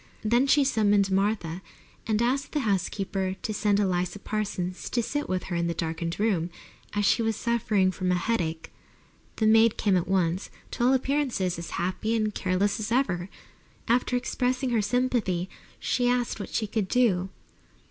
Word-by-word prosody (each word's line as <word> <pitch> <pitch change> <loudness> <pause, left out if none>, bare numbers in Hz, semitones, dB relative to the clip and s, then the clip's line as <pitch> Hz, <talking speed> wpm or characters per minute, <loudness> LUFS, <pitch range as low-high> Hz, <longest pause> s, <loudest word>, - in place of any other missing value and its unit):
Then 240 +5 +3
she 285 +1 +5
summoned 205 -6 +2
Martha 190 -3 0 0.5
and 220 +1 +1
asked 270 +4 0
the 300 - +1
housekeeper 195 -2 -1
to 215 - -2
send 205 -1 +2
Eliza 180 -1 0
Parsons 195 -3 -3
to 240 - 0
sit 290 +6 -3
with 185 0 -1
her 175 - -4
in 170 0 0
the 170 - -2
darkened 165 +1 -3
room, 190 -6 +1 0.4
as 205 -1 +1
she 230 - +3
was 225 -1 0
suffering 215 -5 +1
from 185 0 -1
a - - +3
headache. 175 -5 -2 0.6
The 220 - 0
maid 225 +1 +5
came 200 -3 +2
at 180 - 0
once, 185 -1 0 0.2
to - - -2
all 255 +2 +5
appearances, 260 - 0
as 170 - -6
happy 200 +5 -1
and 215 -1 0
careless 195 +3 0
as 215 +1 -4
ever. 190 -8 0 0.6
After 250 +2 +2
expressing 255 +1 -1
her 230 -2 +2
sympathy 210 -5 0 0.3
she 245 0 +1
asked 245 -2 0
what 200 - -5
she 220 - -1
could 210 -1 -2
do. 190 -6 +2
205 Hz, 170 wpm, -27 LUFS, 185-235 Hz, 0.6 s, she